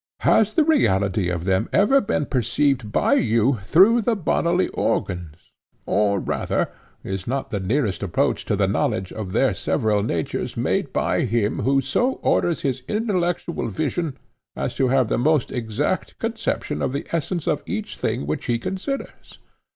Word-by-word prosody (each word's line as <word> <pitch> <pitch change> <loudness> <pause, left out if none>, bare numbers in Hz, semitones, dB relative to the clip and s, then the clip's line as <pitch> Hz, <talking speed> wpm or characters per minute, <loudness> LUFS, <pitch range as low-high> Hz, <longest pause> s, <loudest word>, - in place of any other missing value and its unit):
Has 215 -1 +3
the 315 - +5
reality 100 - +2
of 85 -2 -2
them 95 0 +1
ever 270 +8 +4
been 150 - -1
perceived 130 -2 0
by - - +2
you 115 +2 +2
through 195 - +5
the 230 +1 +1
bodily 175 -1 +1
organs? 85 -3 -3 0.3
or 100 0 +2
rather, - - -1 0.3
is 95 -1 -5
not 135 +2 -2
the 100 - -1
nearest 105 +1 0
approach 95 -4 0
to - - 0
the - - +2
knowledge 95 0 -1
of 105 -4 -5
their - - +2
several 105 -2 0
natures 85 -7 -3
made - - 0
by - - 0
him 110 -1 0
who 135 +1 +2
so 245 - +1
orders 170 -2 +1
his 135 -4 -1
intellectual 180 - -1
vision 140 - -2 0.4
as - - -3
to 130 - +1
have 130 -1 +3
the - - 0
most 150 +1 +2
exact 110 -4 -2
conception 75 - -2
of 125 - -1
the 140 +3 -3
essence 170 +1 -2
of - - +1
each - - -4
thing - - -2
which 75 - -3
he 120 - +1
considers? 190 - -5
125 Hz, 160 wpm, -23 LUFS, -, 0.4 s, the